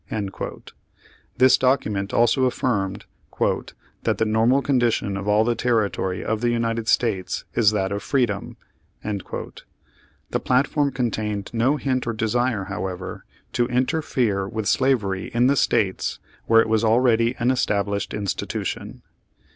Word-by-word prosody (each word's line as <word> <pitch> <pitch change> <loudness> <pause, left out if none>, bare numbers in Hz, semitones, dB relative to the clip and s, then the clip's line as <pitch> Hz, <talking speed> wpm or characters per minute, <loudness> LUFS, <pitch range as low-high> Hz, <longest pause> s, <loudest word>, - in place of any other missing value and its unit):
This 130 0 +6
document 105 -7 +1
also 120 +3 +3
affirmed 105 -6 -1 1.0
"that - - 0
the 110 - +1
normal 115 +5 +3
condition 120 -7 +1
of 100 +1 -5
all 105 +1 +4
the 120 +1 +1
territory 105 -6 -1
of 110 0 -1
the 120 - +2
United 115 -1 -1
States 100 -8 0
is 110 -4 +4
that 100 -2 -1
of 100 0 -2
Freedom." 115 -5 -1 0.5
The 100 -3 -7
platform 140 +3 +2
con 125 -3 -1
tained 105 -1 -4
no 125 +6 +2
hint 130 -3 -1
or 115 - 0
desire, 115 0 0
however, 95 -1 -5 0.3
to 120 -1 +1
interfere 125 - 0
with 110 -1 -3
slavery 105 -7 +1
in 120 +1 +4
the 140 +2 +4
States 105 -8 +1 0.3
where 115 0 +6
it - - -1
was 110 0 +1
already 115 0 +3
an 120 +2 +2
established 100 -5 -1
institution. 100 -2 -4
115 Hz, 130 wpm, -23 LUFS, 100-125 Hz, 1.0 s, This